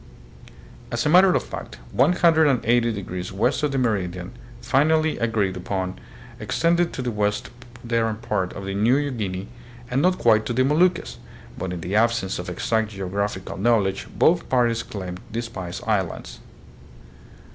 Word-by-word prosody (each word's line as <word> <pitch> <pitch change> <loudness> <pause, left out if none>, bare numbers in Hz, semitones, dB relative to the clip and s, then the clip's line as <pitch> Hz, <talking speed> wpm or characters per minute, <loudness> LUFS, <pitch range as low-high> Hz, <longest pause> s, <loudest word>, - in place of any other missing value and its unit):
As 120 0 -1
a - - +3
matter 185 +3 +7
of - - +1
fact, 60 - -8
180 135 -7 +3
degrees 90 -3 -5
west 115 +10 0
of 150 -1 0
the 135 - -1
meridian 95 -8 -1 0.3
finally 155 +3 +2
agreed 110 -5 0
upon 95 -1 -3 0.4
extended 170 +1 +1
to 130 - -4
the 125 - -1
western 105 0 -1 0.6
part 95 -5 -2
of 95 - -7
New 120 +9 +1
Guinea, 100 -5 -4 0.4
and 130 +2 +2
not 185 +3 +3
quite 110 -2 +4
to 120 - -1
the 130 +2 +3
Moluccas; 170 +5 +1 0.4
but 95 - -4
in 90 -2 -5
the 90 +5 -3
absence 115 -4 +1
of 90 - -5
exact 110 +4 0
geographical 100 -1 -3
knowledge 100 -2 +1
both 170 +1 +3
parties 120 -3 +2
claimed 90 -3 -6
the 115 +2 -2
Spice 95 -6 -6
Islands. 100 -6 -2
115 Hz, 145 wpm, -23 LUFS, 95-135 Hz, 0.6 s, matter